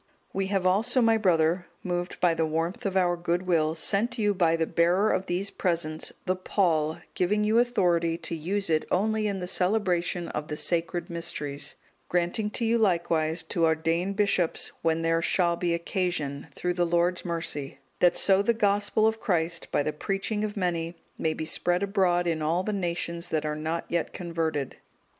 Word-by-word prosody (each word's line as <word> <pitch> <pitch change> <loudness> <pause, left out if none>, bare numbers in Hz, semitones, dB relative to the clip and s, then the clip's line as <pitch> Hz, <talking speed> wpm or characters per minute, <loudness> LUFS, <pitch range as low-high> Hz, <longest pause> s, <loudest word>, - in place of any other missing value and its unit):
'(205) - - -35
"We 195 0 0
have 195 -2 0
also, 205 +7 +3
my 225 -2 +4
brother, 175 -4 +2 0.2
moved 175 0 -3
by 175 -2 +3
the 165 0 0
warmth 165 +5 -2
of 190 -1 -1
our 175 -2 +3
goodwill, 170 -2 0
sent 220 +9 0
you 210 -2 +2
by 170 -4 +2
the 165 0 0
bearer 175 +6 +2
of 185 +1 -1
these 185 +3 -1
presents, 165 -3 -1
the 185 0 +1
pall, 165 -5 +1 0.2
giving 210 +4 +1
you 220 +2 +3
authority 175 -9 +2
to 170 0 -5
use 195 +6 -2
it 155 -1 +2
only 215 +3 +1
in 200 -1 -2
the 180 -1 -4
celebration 180 -3 +1
of 150 0 -4
the 150 -2 -4
Sacred 170 +1 -1
Mysteries; 150 -4 -3 0.3
granting 175 +5 0
to 230 +2 -2
you 230 +1 +2
likewise 170 -5 +1
to 170 -2 0
ordain 165 +4 +1
bishops 200 -4 +1
when 165 0 +1
there 165 0 +2
shall 170 0 +2
be 175 0 -1
occasion, 170 -5 -2
through 180 0 -1
the 175 0 +1
Lord's 175 +1 +1
mercy; 165 -5 -3 0.2
that 175 -1 +4
so 195 0 +5
the 230 +3 +1
Gospel 205 0 +2
of 220 0 +1
Christ, 170 -3 -1
by 145 - +2
the 155 - -2
preaching 195 +6 -2
of 210 -1 -3
many, 170 -2 -1 0.2
may 160 -1 -1
be 160 - -4
spread 175 +3 +1
abroad 185 -3 +2
in 165 -2 -1
all 165 +4 +1
the 215 - -2
nations 170 -2 -3
that 155 -1 -1
are 150 0 -1
not 160 +2 -3
yet 170 -1 -2
converted. 160 -5 -3
175 Hz, 185 wpm, -27 LUFS, 165-195 Hz, 0.3 s, so